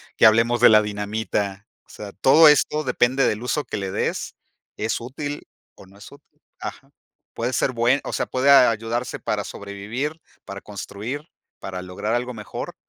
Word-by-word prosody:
que - - +4
hablemos 115 +2 +3
de - - +9
la 105 -1 +6
dinamita. 105 0 -3 0.2
O - - -35
sea, 105 -1 -9
todo 150 +10 +6
esto 150 +1 +3
depende 130 0 +2
del 105 - -1
uso 135 +4 -1
que - - -5
le 95 -2 -4
des. - - -3 0.4
¿Es 110 +2 -2
útil 145 +4 -6 0.3
o 95 - -16
no 100 - -19
es 100 - -13
útil? 145 +1 -20 0.2
Ajá. - - -8 0.4
Puede 120 +2 -2
ser 130 - +1
buen 120 +3 +2
o - - -6
sea, - - -1
puede 130 +2 +1
a 135 -3 +8
ayudarse 115 +2 -3
para - - -2
sobrevivir, 110 +11 -5 0.2
para 100 0 -8
construir, 110 +8 -7 0.3
para 95 -1 -6
lograr 100 +4 -4
algo 125 +1 -1
mejor 105 -2 -7
115 Hz, 175 wpm, -23 LUFS, 105-130 Hz, 0.4 s, de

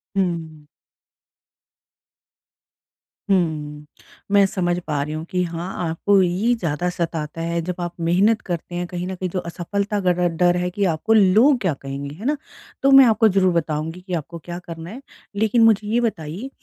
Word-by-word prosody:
हुँ। 165 -5 -2 2.6
हुँ, 155 -5 -1 0.5
मैं 200 -1 +6
समझ 175 -3 -1
पा 150 -2 -1
रही 150 +2 -4
हूँ 155 0 -4
कि 180 -1 0
हाँ, 170 +1 -5 0.2
आपको 195 +4 +3
ये 185 +7 +1
ज़्यादा 175 -4 -2
सताता 165 -2 -4
है 170 0 -1
जब 180 +2 -4
आप 175 0 -4
मेहनत 190 +7 +2
करते 175 0 -4
हैं 175 0 -2
कहीं 180 0 -5
न 190 - -4
कहीं 185 0 -3
जो 185 - -2
असफलता 200 +5 -3
का 180 -1 +3
ड 180 0 +1
डर 175 +1 +3
है 180 0 -1
कि 200 +3 -1
आपको 175 +6 +1
लोग 220 +7 +5
क्या 185 -6 +1
कहेंगे, 140 +1 -7
है 205 +8 -9
ना? 295 +2 +1 0.5
तो 275 - +5
मैं 270 -1 +9
आपको 225 -1 +4
ज़रूर 190 -3 +3
बताऊँगी 165 +1 -2
कि 185 0 -7
आपको 170 +1 -4
क्या 175 0 -6
करना 165 0 -7
है 240 +7 -9 0.3
लेकिन 220 +3 +3
मुझे 215 -2 +4
ये 230 +3 +1
बताइए 200 - -3
180 Hz, 175 wpm, -21 LUFS, 165-200 Hz, 2.6 s, मैं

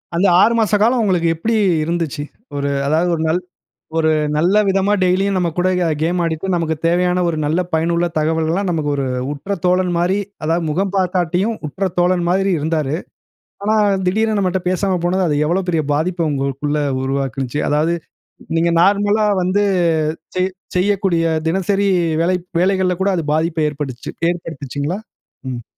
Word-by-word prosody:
அந்த 175 +4 +2 0.2
6 230 - +4
மாச 215 -1 +2
காலம் 240 +2 +3
உங்களுக்கு 180 -5 +1
எப்பிடி 225 +8 -1 0.3
இருந்துச்சு? 160 -3 -2 0.3
ஒரு 140 0 -1 0.2
அதாவது 160 +4 +2
ஒரு 160 - -3
நல் 160 +3 +1 0.6
ஒரு 160 -1 +3 0.3
நல்ல 180 +6 +2
விதமா 195 +1 +2
டெய்லியும் 190 +2 +2
நம்ம 180 -2 +1
கூட 180 +1 +2 0.3
கேம் 175 +2 +1
ஆடிட்டு 160 +2 -2
நமக்கு 165 -2 0
தேவையான 180 +1 +2
ஒரு 165 - -1
நல்ல 155 +4 +1
பயனுள்ள 170 +2 +1
தகவல்கலாம் 160 +5 0
நமக்கு 155 -3 -1
ஒரு 140 -1 -1 0.3
உற்ற 155 +8 -4
தோழன் 180 0 +2
மாரி, 180 +4 +1 0.2
அதாவது 165 +2 0
முகம் 190 +5 -1
பாக்காட்டியும், 185 +3 0
உற்ற 190 +6 -2
தோழன் 175 0 +2
மாரி 195 +2 +2
இருந்தாரு. 155 -1 -1 0.7
ஆனா, 215 +1 +2 0.3
திடீருனு 220 +3 +1
நம்மட்ட 190 -1 0
பேசாம 185 0 0
போனது, 185 +2 +1
அது 150 - +1
எவ்வளோ 180 +4 +1
பெரிய 160 -3 +1
பாதிப்ப 165 +2 0
உங்களுக்குள்ள 140 +2 -1 0.2
உருவாக்கினுச்சு? 135 0 -2
அதாவது 155 +3 +1 0.6
நீங்க 170 +1 +2
நார்மலா 205 +2 +3
வந்து 185 +3 +1 0.7
செய் 185 +1 0 0.3
செய்யக்கூடிய 190 -3 +1 0.2
தினசரி 195 +3 +1 0.3
வேலை 180 +2 +2 0.2
வேலைகள்ல 185 -1 +2
கூட 195 - +2
அது 165 - -1
பாதிப்ப 160 +1 0
ஏற்படுச்சு 140 -4 -6 0.2
ஏற்படுத்துச்சுங்களா? 160 0 -4 0.5
ம். 120 -2 -5
175 Hz, 145 wpm, -18 LUFS, 160-190 Hz, 0.7 s, 6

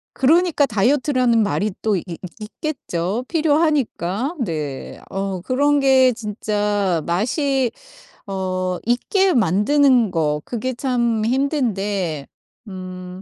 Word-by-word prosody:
그러니까 315 +2 +3
다이어트라는 250 +1 +2
말이 205 0 0
또 215 -2 +1
있 175 - -2
있 170 - -7 0.2
있겠죠 215 - -4
필요하니까. 295 - 0
네. 150 - -5
어 195 -2 -3
그런 285 +6 +2
게 265 -2 +5
진짜 205 -4 -1
맛이 255 - 0 0.6
어 185 -2 -2
있게 370 - +2
만드는 240 - +3
거 150 -3 0
그게 255 +2 -3
참 235 -3 0
힘든데 205 - -1 0.4
음 185 -1 -8
220 Hz, 210 characters per minute, -20 LUFS, 185-270 Hz, 0.6 s, 게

